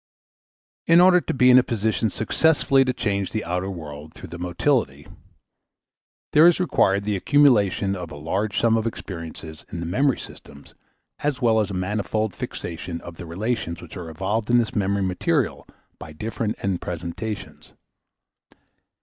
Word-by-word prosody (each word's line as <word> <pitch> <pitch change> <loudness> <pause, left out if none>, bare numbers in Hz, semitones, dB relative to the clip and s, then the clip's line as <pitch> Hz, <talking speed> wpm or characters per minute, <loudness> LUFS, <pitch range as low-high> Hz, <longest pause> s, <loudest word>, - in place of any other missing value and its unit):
In 165 +1 +7
order 180 0 +6
to - - -3
be 125 -1 +5
in 125 - +8
a - - +2
position 110 -1 0
successfully 135 +5 +2
to 130 - +1
change 100 -5 -2
the 110 -4 -3
outer 90 +3 -2
world 75 -4 -8
through - - -10
the 85 - -8
motility, 90 +10 0 1.3
there 155 +3 +8
is 175 - +4
required 100 - +2
the 105 0 -1
accumulation 100 -6 +3
of 90 -3 -6
a - - -9
large 95 +8 -2
sum 115 -1 +3
of 110 0 -1
experiences 80 -6 -7
in 85 - -5
the 85 - -4
memory 130 - +1
systems 70 0 -12 0.5
as 145 -3 -1
well 115 -4 +3
as 105 -2 0
a 100 - -4
manifold 105 +2 -2
fixation 85 0 -6
of 85 -1 -10
the 85 - -8
relations 95 -1 -3
which - - -11
are 85 -3 -7
evoked 100 +7 -2
in 120 - +5
this 115 -2 0
memory 100 0 +1
material 90 -1 -1 0.3
by 75 - -9
different 110 +5 -3
end 95 -3 -1
presentations. 90 +5 -6
100 Hz, 160 wpm, -23 LUFS, 85-115 Hz, 1.3 s, in